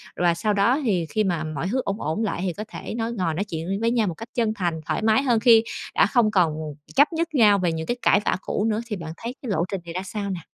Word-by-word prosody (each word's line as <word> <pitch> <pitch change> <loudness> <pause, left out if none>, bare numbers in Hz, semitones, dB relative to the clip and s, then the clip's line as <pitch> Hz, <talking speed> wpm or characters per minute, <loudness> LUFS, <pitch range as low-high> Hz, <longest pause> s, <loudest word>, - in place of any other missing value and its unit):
Và 175 -1 +2
sau 210 +5 0
đó 205 +8 +3
thì 185 -8 +1
khi 215 -1 +1
mà 175 -5 -1
mọi 155 +1 -3
hứ 255 +6 0
ổn 200 +2 -3
ổn 160 +9 -1
lại 195 -4 -2
thì 185 -2 -1
có 210 - -6
thể - - -7
nói, 230 0 -2
ngồi 180 -7 -1
nói 180 - -1
chuyện 165 -5 -5
với 230 - +2
nhau 230 -4 +2
một 175 - -2
cách 225 +7 -10
chân 225 -3 +1
thành, 175 -6 -2
thoải - - -1
mái 220 +5 +3
hơn 240 -4 +3
khi 225 -1 +6 0.3
đã - - +5
không 235 -5 +3
còn 175 -6 +3 0.4
chấp 290 +4 +5
nhất 330 0 -2
nhau 210 -5 +5
về 175 -2 +1
những 160 0 -3
cái 240 - -1
cãi 200 - +4
vã - - +1
cũ 205 - -2
nữa. 215 +1 0
Thì 210 - -3
bạn 160 -3 -7
thấy 235 +3 -6
cái 255 - -6
lộ 170 -4 +1
trình 190 -3 -3
này 170 - -7
ra 185 +2 -3
sao 200 +1 -4
nè? 185 -2 -3
205 Hz, 290 wpm, -24 LUFS, 175-230 Hz, 0.4 s, khi